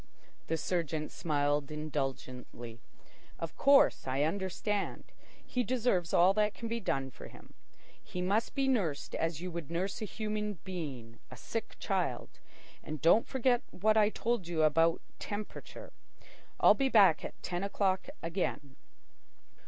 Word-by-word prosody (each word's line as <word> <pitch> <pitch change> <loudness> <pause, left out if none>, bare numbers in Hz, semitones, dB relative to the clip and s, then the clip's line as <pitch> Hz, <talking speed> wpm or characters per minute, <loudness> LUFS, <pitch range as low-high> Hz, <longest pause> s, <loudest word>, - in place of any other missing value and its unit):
The 165 - 0
surgeon 160 -3 -2
smiled 145 -2 0
indulgently. 135 -6 -5 0.6
"Of 165 - -5
course 280 - +5
I 135 +2 +1
understand. 195 +4 -2 0.4
He 250 - -1
deserves 235 -9 +1
all 180 +3 +5
that 210 0 +1
can 230 - -5
be 230 +1 -2
done 135 -10 -1
for - - -11
him. - - -15 0.5
He 180 - -7
must 200 +5 0
be 275 -1 +1
nursed 180 - 0
as 165 -1 -1
you 180 0 -4
would 170 -4 -6
nurse 185 +6 -2
a - - -1
human 210 0 -3
being, 135 -11 -6
a - - -10
sick - - -5
child. - - -2 0.4
And 155 0 -6
don't 170 +9 +5
forget 255 -2 +2
what 215 +4 +2
I 210 -1 +5
told 230 -4 -1
you 165 -2 +1
about 165 +2 +3 0.2
temperature. 215 - -7 0.7
I'll - - +8
be 270 -1 +1
back 195 -9 +6
at - - -7
ten 175 +1 -2
o'clock 195 +2 0
again." 165 -5 -3
180 Hz, 145 wpm, -32 LUFS, 155-215 Hz, 0.7 s, I'll